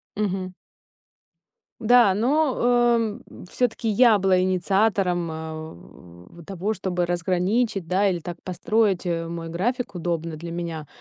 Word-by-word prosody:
Мгм. 190 -3 -2 1.3
Да, 235 -3 +5
но, 265 +7 +1 0.4
эм, 225 -2 -2
м, - - -12
всё-таки 240 -2 -1
я 220 +1 +5
была 190 -1 +3
инициатором, 185 -1 +1
э, 160 0 -6
в 90 - -12
в - - -15
того, 195 +3 -3
чтобы 180 -3 -2
разграничить, 185 +4 0
да, 195 +3 +2
или 180 -2 -1
так 170 +1 -7
построить, 195 +1 0
э, 165 -1 -2
мой 165 0 -6
график 235 +10 -2
удобно 165 -2 -3
для 170 +1 -7
меня. 170 -3 -5
185 Hz, 135 wpm, -24 LUFS, 170-215 Hz, 1.3 s, Да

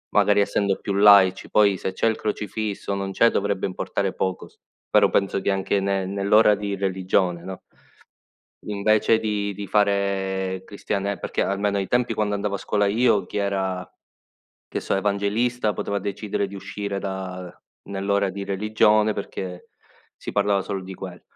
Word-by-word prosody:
magari 105 0 +4
essendo 100 -1 +1
più 100 - -3
laici. 100 -2 +6
Poi 100 -2 +4
se 95 - -4
c'è 115 - +1
il 110 - +2
crocifisso, 105 -1 -3
o - - -1
non 100 0 -3
c'è, 115 +4 +4
dovrebbe 100 -2 -1
importare 95 +1 -2
poco 95 -1 -2
s - - -25 0.3
però - - +5
penso 100 0 +1
che - - -1
anche 95 +1 0
ne 95 -1 0
nell'ora 100 +3 +4
di 100 0 -3
religione, 95 -2 0
no 95 0 -7 1.0
invece 110 +2 +2
di 105 -2 -2
di 100 +1 -7
fare 95 -2 0
cristiane 100 -1 -3
perché - - -3
almeno 100 +1 0
ai 95 - -2
tempi 120 -2 +1
quando 105 -1 0
andavo 100 0 -2
a - - -2
scuola 105 +1 0
io 110 0 +2
chi - - -6
era, 95 -2 -2 0.8
che - - -3
so, - - -2
evangelista, 105 +4 0
poteva 100 0 -2
decidere 100 0 -3
di 100 - -11
uscire 100 0 -5
da 95 -2 -5 0.4
nell'ora 100 0 0
di 100 +1 -6
religione 105 +2 +2
perché 95 -3 -6 0.5
si - - -7
parlava 100 -1 +1
solo 95 +1 -4
di 95 +1 -8
quello. 90 -1 -9
100 Hz, 165 wpm, -23 LUFS, 95-105 Hz, 1.0 s, laici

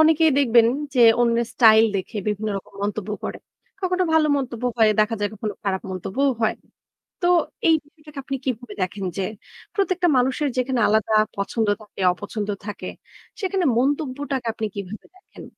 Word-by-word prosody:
অনেকেই 320 0 +5
দেখবেন 235 -4 +5 0.3
যে 250 - +3 0.2
অন্যের 235 -1 +2
স্টাইল 220 -2 +6
দেখে 190 +4 -5
বিভিন্ন 210 +1 -2
রকম - - -16
মন্তব্য 210 0 -3
করে। - - -4 0.4
কখনো 370 -1 0
ভালো 320 -1 +4
মন্তব্য 250 -3 -4
হয়, 220 -1 +6
দেখা 215 +2 +2
যায় 205 - +1
কখনো 210 0 -4
খারাপ 190 -1 -1
মন্তব্যও 210 +9 0
হয়। 220 - +2 0.7
তো - - +2 0.4
এই 325 - +6
বিষয়টাকে 300 -1 -11
আপনি 275 -1 -3
কিভাবে 245 -4 -4
দেখেন 190 +2 -3
যে, - - 0 0.5
প্রত্যেকটা 370 -3 +1
মানুষের 265 +4 +1
যেখানে 255 -1 0
আলাদা 220 +1 +2 0.2
পছন্দ 205 +2 -1
থাকে, 210 - -13
অপছন্দ 205 +3 -5 0.2
থাকে, 205 -2 -6 0.5
সেখানে 380 -2 0
মন্তব্যটাকে 275 -1 -1
আপনি 220 - -3
কিভাবে 200 +1 -7
দেখেন? 375 - -14
235 Hz, 155 wpm, -23 LUFS, 210-290 Hz, 0.7 s, স্টাইল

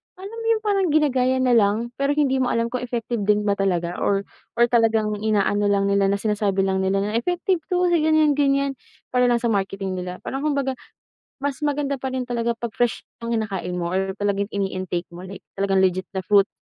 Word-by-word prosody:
alam 390 +4 -9
mo 455 - -6
'yun 450 -1 +2
parang 400 -2 +2
ginagaya 260 -4 +2
na 250 - +3
lang, 225 +1 +2
pero 280 +1 +1
hindi 270 -3 +2
mo 255 - +1
alam 230 0 0
kung 250 - -2
effective 240 -1 -3
din 210 0 +3
ba 205 - +1
talaga 175 -2 0
or 200 0 +1 0.3
or 235 - +4
talagang 220 -3 +2
inaano 205 -1 +1
lang 200 -1 +2
nila 200 0 +3
na 200 - +2
sinasabi 200 -2 0
lang 190 0 0
nila 195 +1 +1
na 210 +3 0
effective 355 +5 0
'to 360 -1 +1
sa 340 - +4
ganyan 310 -1 +4
ganyan, 275 -1 +1 0.3
para 250 -1 +3
lang 240 0 +1
sa 235 - +2
marketing 195 -1 -2
nila. 180 0 -7
Parang 270 - -4
kumbaga, 280 -2 0 0.7
mas 285 +1 -3
maganda 290 -1 0
pa 265 - -2
rin 255 -1 -3
talaga 235 -1 -1
'pag 235 -2 -5
fresh 240 -2 -1 0.2
ang 235 0 -2
kinakain 195 -4 -3
mo 170 0 -2
or 190 +1 -1
talagang 200 0 -1
ini-intake 185 -3 -3
mo, 175 - -9 0.3
talagang 195 0 0
legit 185 0 +1
na 190 - -2
fruit, 200 +1 +4
230 Hz, 205 wpm, -23 LUFS, 195-270 Hz, 0.7 s, or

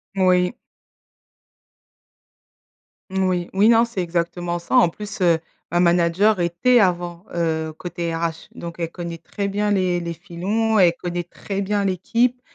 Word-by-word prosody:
Moui. 180 0 +3 2.6
Moui. 185 -2 0
Oui, 200 +3 +4
non, 230 0 +5
c'est 230 -5 -4
exactement 175 0 -2
ça. 170 - -3
En 245 -9 +6
plus, 205 +4 -8
heu, 170 -2 +4 0.3
ma 175 - +2
manager 175 +4 +3
était 175 +9 +3
avant, 175 -2 0
heu, 160 -2 -1
côté 170 -1 -4
RH 165 -1 -3
donc 170 0 -7
elle 165 -1 -2
connaît 170 -1 -6
très 200 +4 -4
bien 205 +1 0
les 185 -3 +1
les 170 -1 -4
filons, 200 +6 -1
elle 175 -3 +6
connaît 175 0 -2
très 195 +3 -5
bien 200 0 0
l'équipe 235 +7 +1
180 Hz, 145 wpm, -22 LUFS, 170-200 Hz, 2.6 s, En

